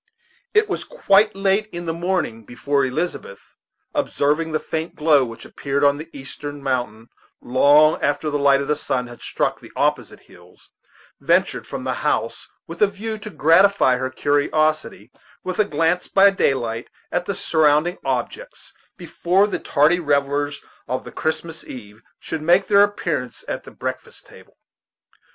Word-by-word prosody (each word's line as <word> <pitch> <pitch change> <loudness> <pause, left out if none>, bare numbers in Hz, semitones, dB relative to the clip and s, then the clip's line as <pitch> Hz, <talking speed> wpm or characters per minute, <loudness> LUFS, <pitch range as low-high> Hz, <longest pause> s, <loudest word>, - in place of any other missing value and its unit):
It 430 0 +4
was - - -3
quite 215 - +2
late 195 +2 +1
in 175 -4 -7
the 165 - -2
morning 170 -10 -2
before 140 +5 -1
Elizabeth, 135 - -4 0.4
observing 150 +3 0
the 155 - 0
faint 160 +1 -4
glow 150 -3 +4
which 115 -2 -8
appeared 140 0 -3
on 145 0 +3
the 155 +1 -9
eastern 145 +1 -8
mountain 120 -4 -3 0.3
long 145 +5 +4
after 145 +2 0
the 145 - -1
light 140 -1 +4
of 140 - -4
the 150 - +1
sun 125 -3 -2
had 120 -1 -12
struck - - -2
the - - -14
opposite - - -1
hills, - - -20 0.5
ventured - - +1
from - - -6
the - - -1
house, - - -1 0.2
with 165 +1 -10
a 210 - +6
view 215 +2 -6
to 215 +1 -8
gratify 165 -6 +4
her 130 +1 -2
curiosity 145 -4 0 0.3
with 185 +1 -4
a 215 - +4
glance 165 +1 0
by 200 0 +5
daylight 120 -10 -1 0.2
at 175 0 -1
the 200 - -2
surrounding 160 +2 +2
objects - - -4 0.2
before 185 +4 +1
the 205 - -3
tardy 155 +5 +2
revellers 145 -2 0 0.3
of 130 - -3
the - - -10
Christmas 160 0 -3
eve 110 -3 -11 0.2
should 160 - -5
make 175 +5 +3
their 200 +1 +5
appearance 165 -11 -1
at - - -5
the - - -10
breakfast - - -7
table. - - -18
155 Hz, 160 wpm, -21 LUFS, 140-180 Hz, 0.5 s, a